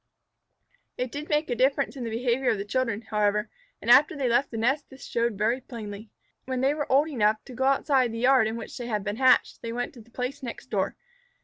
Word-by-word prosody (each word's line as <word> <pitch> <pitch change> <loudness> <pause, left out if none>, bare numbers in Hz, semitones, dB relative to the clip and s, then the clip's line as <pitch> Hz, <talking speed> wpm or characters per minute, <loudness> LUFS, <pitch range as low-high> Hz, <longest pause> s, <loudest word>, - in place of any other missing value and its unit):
It 250 -1 -3
did 295 +2 -6
make 300 +1 +1
a - - +1
difference 275 +3 +1
in 260 - -5
the 230 - -3
behavior 240 +3 0
of 220 - +1
the 200 - -4
children, 230 0 -1
however, 210 0 0 0.3
and - - +3
after 295 +2 +6
they 270 -3 0
left 245 +4 +2
the 225 - -6
nest 270 +6 0
this 265 -1 -12
showed 235 -3 -1
very 230 +5 +1
plainly. 215 -4 -8 0.4
When 255 -1 -2
they 270 +2 +3
were 295 -2 -4
old 285 +4 +4
enough 215 -6 +1
to 255 - -10
go 265 +2 -1
outside 270 -2 +2
the 230 - -5
yard 250 -1 +4
in 220 - -3
which - - -8
they 240 - -5
had 210 -4 -2
been 205 +1 -3
hatched, 260 -1 +3
they 230 - -5
went 245 +1 -3
to 240 - -12
the 225 - -20
place 250 +4 -4
next 240 -3 -8
door. - - 0
245 Hz, 235 wpm, -26 LUFS, 225-265 Hz, 0.4 s, after